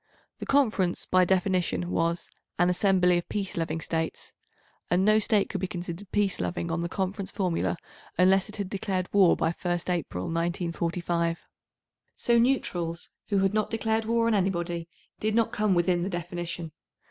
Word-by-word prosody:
The - - -6
Conference 220 -10 +2
by 185 0 +4
definition 180 - +1
was 170 - -1 0.3
"an 175 0 +4
assembly 180 -1 +3
of 175 - -9
peace 200 -2 -3
loving 165 -1 -2
States," 160 0 -3 0.6
and 180 +2 +3
no 215 +1 +5
State 210 -1 +2
could 190 - -4
be 190 - 0
considered 180 +2 -6
peace 205 -2 +1
loving 170 -1 -2
on 165 +1 -1
the 170 - -2
Conference 190 +1 -2
formula 180 -3 -1 0.4
unless 190 +2 +4
it 210 - -6
had 200 -3 -3
declared 190 -1 -2
war 195 -4 +6
by 165 - +1
1st 175 +1 -2
April, 155 - -2
1945. 170 - -1 0.7
So 235 -1 +3
neutrals 175 -10 0 0.2
who 200 - +1
had 195 +1 +2
not 215 0 +1
declared 225 0 0
war 230 +1 +2
on 230 - +3
anybody 175 -4 -1 0.3
did 215 0 0
not 230 -1 +2
come 210 -3 +1
within 175 0 +2
the 185 - -1
definition. 175 -2 -4
180 Hz, 165 wpm, -27 LUFS, 170-200 Hz, 0.7 s, war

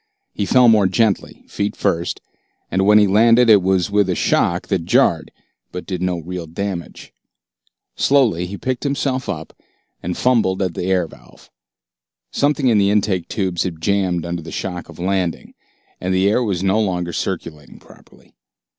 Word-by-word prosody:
He 100 - -3
fell 125 -1 +5
more 110 -4 +5
gently, 105 +1 -1
feet 105 +1 -3
first, 85 0 -1 0.5
and 95 +1 +1
when 105 0 +7
he 105 - +6
landed 115 +4 +5
it 105 -2 +6
was 95 0 0
with 100 -2 +2
a 90 - 0
shock 85 +1 0
that 95 -4 0
jarred - - +2 0.4
but 90 - -7
did 90 -3 -4
no 90 -1 -1
real 85 +1 -6
damage. 90 +1 -6 0.8
Slowly 115 -11 +2
he 100 +2 -7
picked 130 +3 -3
himself 140 -2 -2
up - - -5 0.5
and 90 +1 -4
fumbled 115 -7 +2
at 90 -2 -2
the 90 - -4
air 95 -2 +1
valve. 80 - -18 0.8
Something 145 -1 0
in 110 -4 +4
the 100 0 +3
intake 100 -4 0
tubes 95 -5 -2
had 85 -4 -3
jammed 90 -2 0
under 85 0 -4
the 85 - -10
shock 90 -2 -5
of 85 - -12
landing, 90 -1 -2 0.5
and 90 - -3
the 95 +1 +2
air 105 +5 +2
was 95 -5 -2
no 100 +3 +2
longer 90 -4 -2
circulating 80 -6 -5
properly. - - -20
95 Hz, 170 wpm, -19 LUFS, 90-105 Hz, 0.8 s, when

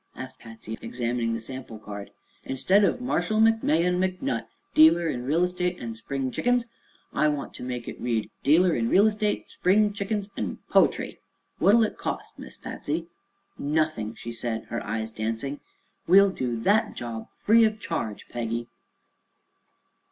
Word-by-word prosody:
asked - - -8
Patsy, 110 -1 -9
examining 120 0 -1
the - - -3
sample 130 -1 -8
card. 105 -2 -8 0.3
"Instead 185 +10 +3
of 200 - +2
'Marshall 220 -3 0
McMahon 180 -6 +3
McNutt, 180 -11 -1 0.3
dealer 165 +2 +6
in 125 -5 -3
Real 160 +6 +2
Estate 180 0 -1
an' 115 -1 -5
Spring 130 +3 -3
Chickens,' 245 - +1 0.5
I 150 - +3
want 145 -2 -2
to - - -9
make 125 -1 -4
it - - -7
read: 115 -3 -1
'dealer 170 +5 +4
in 115 0 0
Real 200 +3 +6
Estate, 210 -1 0
Spring 205 +3 +3
Chickens 205 0 -3
an' - - -3
Poetry.' - - +3 0.4
What'll 225 +3 +6
it 215 - -2
cost. - - -4
Miss - - -10
Patsy?" 165 +3 -4 0.5
"Nothing," 145 -7 0
she 120 - -7
said, 115 -1 -3
her 115 - -3
eyes 110 +1 -3
dancing; 115 +6 -3 0.5
"We'll 195 +3 +7
do 125 -9 -2
that 210 - +2
job 115 -2 -6
free 225 +2 +5
of 215 -1 +2
charge, 115 - -4
Peggy!" 120 0 -3
145 Hz, 150 wpm, -26 LUFS, 115-190 Hz, 0.5 s, We'll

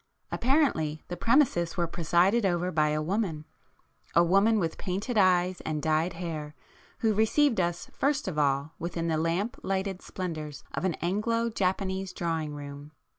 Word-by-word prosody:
Apparently, 235 - +1
the 175 - -3
premises 225 - +2
were 175 - +2
presided 175 +7 +2
[p 200 - +2
106] 175 - +2
over 180 +1 -2
by 155 -2 +2
a 155 0 0
woman,—a 170 -2 -3
woman 195 +6 +4
with 165 -5 -2
painted 200 +7 -3
eyes 185 -2 +3
and 155 -1 -2
dyed 160 +3 +1
hair 155 -4 -5 0.5
who 220 -2 +3
received 225 +3 +3
us 175 -1 -1
first 285 -2 0
of 160 -5 -2
all 140 +1 +1
within 170 0 -2
the 160 - +1
lamp 170 +8 -1
lighted 190 -1 -2
splendours 155 -6 -5
of - - -2
an 175 -4 +1
Anglo 230 +6 0
Japanese 190 -1 -1
drawing 160 -4 -2
room. 145 +1 -9
175 Hz, 160 wpm, -28 LUFS, 160-200 Hz, 0.5 s, woman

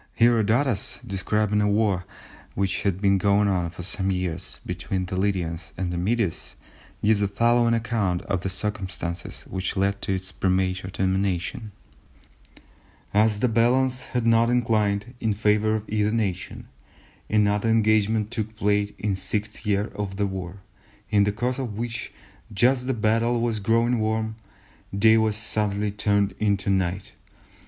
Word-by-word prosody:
Herodotus 115 +1 +2
describing 105 +2 0
a 105 - +2
war 100 -4 +1 0.5
which 95 -1 0
had 100 -3 0
been 100 -1 +3
going 100 +1 +3
on 90 -3 0
for 90 +1 -9
some 95 +2 -1
years 90 -4 -3
between 90 +1 -3
the 90 - -5
Lydians 90 -4 -2
and 90 -2 -2
the - - -2
Medes 105 0 -1 0.5
gives 105 0 +4
the 100 - +2
following 115 +3 +3
account 110 -6 -1
of 95 -3 -2
the 95 - -2
circumstances 95 -3 -4
which 95 +1 -4
led 100 +1 0
to 95 - -1
its 95 0 -6
premature 95 0 0
termination:—"As 100 +2 -3
the - - +4
balance 125 +3 +2
had 125 -2 -2
not 115 0 +4
inclined 110 -2 +1
in 110 -3 0
favour 105 +1 +2
of 110 0 -4
either 105 0 +1
nation, 100 -5 -3 0.6
another 105 +1 +2
engagement 110 -1 +2
took 110 -2 -4
place 105 -1 +1
in 105 - -1
the - - 0
sixth 105 +3 -3
year 105 +1 +1
of 100 -2 -4
the 100 - +1
war, 95 -1 -6 0.5
in 100 -1 +4
the 105 - +1
course 125 +5 -2
of 115 -6 -4
which, 120 0 -4 0.4
just 125 +6 +3
as 125 - -8
the 130 - 0
battle 115 +2 +1
was 115 -2 0
growing 115 +3 +2
warm, 110 0 -1 0.6
day 110 +2 +6
was 110 -1 +2
suddenly 105 -1 -1
turned 100 0 +1
into 100 -2 +1
night. 95 0 -1
105 Hz, 150 wpm, -25 LUFS, 95-110 Hz, 0.6 s, day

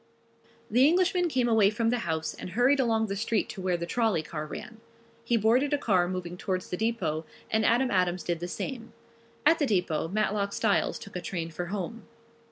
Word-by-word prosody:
The 250 +5 +6
Englishman 360 +1 +2
came 255 -4 +1
away 220 -4 +5
from 225 +2 0
the 245 - 0
house 160 -5 -2
and - - -8
hurried 245 +8 +3
along 225 -3 +2
the 195 -2 -3
street 220 +1 0
to 195 - -7
where 185 -1 0
the 170 - -4
trolley 215 -3 +1
car 155 0 -5
ran. 225 +7 -8 0.4
He 235 0 +2
boarded 245 +7 +3
a - - +4
car 185 -10 +2
moving 180 -1 -4
towards 185 0 -3
the - - 0
depot 185 -8 -1 0.3
and 220 0 +2
Adam 245 +3 +3
Adams 180 -1 +1
did 170 -2 -2
the 175 - -4
same. 230 +5 -5 0.5
At 325 +2 +5
the 290 - +2
depot 180 -7 0
Matlock 200 +1 0
Styles 210 -3 +1
took 200 - -11
a 180 - -3
train 170 -2 -4
for 175 +2 -4
home. 205 +4 -5
210 Hz, 200 wpm, -28 LUFS, 180-235 Hz, 0.5 s, The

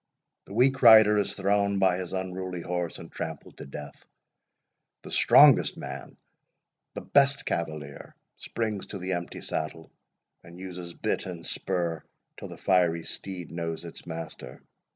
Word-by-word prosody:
The 100 - -10
weak 135 +3 +3
rider 110 -3 +8
is 100 - -2
thrown 100 0 +1
by 95 -2 +3
his 90 -2 -5
unruly 95 -1 -4
horse, 90 -1 -3
and - - -11
trampled 80 -3 -7
to - - -8
death—the 70 +1 -14
strongest - - +6
man, - - -8 0.8
the - - -4
best 140 0 +3
cavalier, 75 -4 -4 0.2
springs 110 -4 -4
to 100 - -6
the 95 0 -3
empty 85 -1 -5
saddle, 80 +1 -4 0.5
and 85 +1 -13
uses 90 -2 -8
bit - - -2
and 85 -2 -7
spur 85 -4 -2 0.3
till - - -7
the - - -10
fiery 85 -3 +2
steed 90 -2 -7
knows 85 0 -4
its 85 - -10
master. 80 -1 -8
90 Hz, 140 wpm, -27 LUFS, 85-100 Hz, 0.8 s, rider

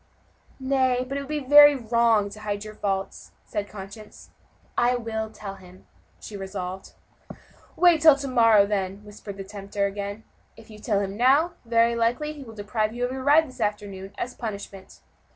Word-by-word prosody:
"Nay, 260 -1 +1
but 275 - -5
it 280 -1 -4
would 295 -3 -4
be 290 +1 +9
wrong 230 -3 +2
to 215 - -10
hide 205 -1 -4
your 215 - -8
fault," 195 -2 -4 0.2
said 205 -1 -4
conscience. 205 +1 -11 0.4
"I 245 +1 +2
will 220 -2 -4
tell 200 -2 -9
him," 185 0 -16 0.3
she 210 - -10
resolved. 190 -1 -6 0.8
"Wait 345 -3 +4
till 310 -2 +8
to 280 0 -5
morrow, 230 -5 +5
then," 200 0 -3
whispered 205 -1 -10
the 195 - -6
tempter 200 0 -4
again; 200 +2 -5 0.3
"if 225 0 -15
you 210 - -12
tell 210 -2 0
him 195 0 -4
now, 275 +8 +4
very 230 0 +3
likely 240 +7 0
he 290 -2 -10
will 225 -3 -12
deprive 215 +2 -2
you 245 +1 -1
of 250 - -4
your 265 0 -5
ride 305 +3 +5
this 255 -2 -12
afternoon, 205 -2 -3
as 250 - -4
a - - -27
punishment." 200 -3 -8
220 Hz, 180 wpm, -25 LUFS, 200-255 Hz, 0.8 s, be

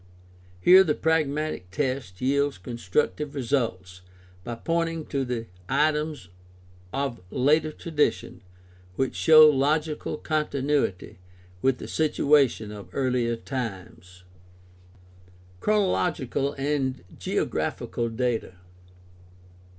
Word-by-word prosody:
Here 185 - +8
the 155 -5 0
pragmatic 155 - -1
test 130 -6 -3
yields 140 -1 +1
constructive 115 - -2
results 115 -9 -2 0.4
by 120 - -5
pointing 165 +4 -1
to 125 -5 -2 0.2
items 150 - 0 0.6
of 135 -5 -3
later 150 - +2
tra 170 - -9
dition 150 -2 0 0.6
which 130 +4 -1
show 155 -1 +8
logical 150 +2 0
continuity 145 - -1 0.4
with 130 -1 +2
the - - -8
situation 145 -7 +2
of 105 -1 -10
earlier 125 -3 0
times. 95 -7 -7 1.4
Chronological 175 - 0
and 135 -4 -2 0.2
geographical 115 -1 -2
data. 115 -4 -2
135 Hz, 90 wpm, -26 LUFS, 115-150 Hz, 1.4 s, Here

